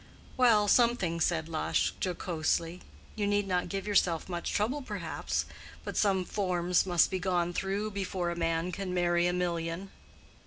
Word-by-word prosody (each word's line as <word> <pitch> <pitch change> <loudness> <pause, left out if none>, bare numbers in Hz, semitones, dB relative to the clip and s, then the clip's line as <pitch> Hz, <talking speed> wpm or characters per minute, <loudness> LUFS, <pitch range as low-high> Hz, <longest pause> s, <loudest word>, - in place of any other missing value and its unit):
"Well, 225 -5 +4
something," 205 -8 +3
said 160 -1 +1
Lush, 160 -1 0
jocosely. 170 -1 -1 0.3
"You 205 -2 -1
need 205 0 +1
not 180 -1 0
give 195 0 -3
yourself 180 -5 +2
much 175 -2 -3
trouble, 245 +8 0
perhaps. 260 - -3 0.4
But - - -5
some 190 -3 +2
forms 180 -2 +1
must 175 -2 +3
be 190 - -1
gone 175 -1 0
through 200 +3 -2
before 190 -3 -2
a - - -4
man 165 +1 -1
can 185 -1 -4
marry 175 0 +2
a - - +2
million." 175 +1 -2
180 Hz, 155 wpm, -30 LUFS, 170-200 Hz, 0.4 s, Well